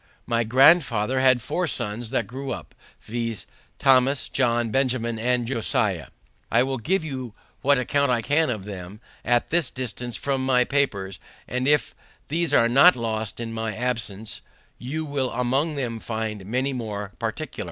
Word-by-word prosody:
My 115 Hz, 0 st, +1 dB
grandfather 130 Hz, -1 st, +4 dB
had 130 Hz, -2 st, +4 dB
four 180 Hz, +6 st, -1 dB
sons 115 Hz, -3 st, -3 dB
that 130 Hz, -, 0 dB
grew 135 Hz, +2 st, -6 dB
up, -, -, -7 dB, 0.3 s
viz.: 115 Hz, -3 st, -3 dB, 0.3 s
Thomas, 135 Hz, 0 st, +3 dB
John, 120 Hz, -3 st, +1 dB
Benjamin 120 Hz, -3 st, 0 dB
and 125 Hz, +1 st, +1 dB
Josiah. 115 Hz, -2 st, 0 dB, 0.4 s
I 120 Hz, +2 st, +4 dB
will 135 Hz, -1 st, -2 dB
give 185 Hz, -, 0 dB
you 130 Hz, -7 st, -5 dB, 0.3 s
what 140 Hz, +1 st, +4 dB
account 140 Hz, +3 st, +1 dB
I 120 Hz, -2 st, +1 dB
can 155 Hz, +4 st, +2 dB
of 105 Hz, -6 st, -3 dB
them 100 Hz, 0 st, -8 dB, 0.2 s
at 120 Hz, 0 st, +1 dB
this 165 Hz, -4 st, +2 dB
distance 125 Hz, -2 st, -5 dB
from 135 Hz, -2 st, -1 dB
my 130 Hz, -1 st, +4 dB
papers, 105 Hz, -9 st, -1 dB, 0.3 s
and 125 Hz, +1 st, -1 dB
if 150 Hz, 0 st, +3 dB, 0.4 s
these 165 Hz, +1 st, 0 dB
are 115 Hz, -5 st, +5 dB
not 140 Hz, +9 st, +7 dB
lost 110 Hz, -2 st, -3 dB
in 115 Hz, -1 st, -4 dB
my 110 Hz, -2 st, -3 dB
absence, 110 Hz, -3 st, -4 dB, 0.4 s
you 155 Hz, +6 st, -4 dB
will 140 Hz, -3 st, -1 dB
among 135 Hz, +6 st, 0 dB
them 120 Hz, -5 st, -3 dB
find 110 Hz, -4 st, -4 dB
many 130 Hz, +5 st, 0 dB
more 105 Hz, -5 st, -5 dB
particulars. -, -, -4 dB
125 Hz, 160 wpm, -24 LUFS, 115-135 Hz, 0.4 s, not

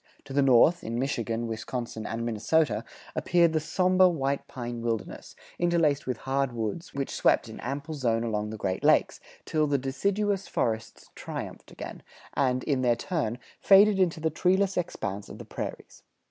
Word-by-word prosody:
To 135 Hz, -, -8 dB
the 140 Hz, -, +3 dB
north, 135 Hz, +6 st, +5 dB
in 115 Hz, +1 st, -3 dB
Michigan, 115 Hz, -3 st, -1 dB
Wisconsin, 115 Hz, -1 st, -4 dB
and 115 Hz, +1 st, -3 dB
Minnesota, 130 Hz, +8 st, +1 dB, 0.3 s
appeared 170 Hz, -2 st, +3 dB
the 155 Hz, -, +2 dB
somber 185 Hz, +3 st, +3 dB
white 140 Hz, -4 st, -1 dB
pine 120 Hz, -2 st, -5 dB
wilderness, 115 Hz, -4 st, -4 dB, 0.2 s
interlaced 165 Hz, -5 st, +2 dB
with 125 Hz, -3 st, -1 dB
hard 135 Hz, -1 st, 0 dB
woods, 115 Hz, +10 st, -4 dB
which 140 Hz, -1 st, -2 dB
swept -, -, +3 dB
in -, -, -9 dB
ample 140 Hz, +3 st, -4 dB
zone 115 Hz, -6 st, 0 dB
along 105 Hz, -2 st, -2 dB
the 110 Hz, -, -6 dB
Great 95 Hz, -2 st, -2 dB
Lakes, -, -, +3 dB, 0.3 s
till 155 Hz, -1 st, +1 dB
the 140 Hz, -1 st, +2 dB
deciduous 195 Hz, +10 st, -1 dB
forests 115 Hz, -1 st, -3 dB
triumphed -, -, -7 dB
again, -, -, -8 dB, 0.3 s
and, 130 Hz, -2 st, +1 dB
in 140 Hz, -4 st, 0 dB
their 120 Hz, -2 st, +3 dB
turn, 125 Hz, -, -2 dB, 0.2 s
faded 200 Hz, 0 st, +6 dB
into 175 Hz, -4 st, +2 dB
the 160 Hz, 0 st, 0 dB
treeless 190 Hz, +4 st, +2 dB
expanse 105 Hz, -, -3 dB
of -, -, -9 dB
the -, -, -9 dB
prairies. -, -, -7 dB
135 Hz, 165 wpm, -28 LUFS, 115-170 Hz, 0.3 s, faded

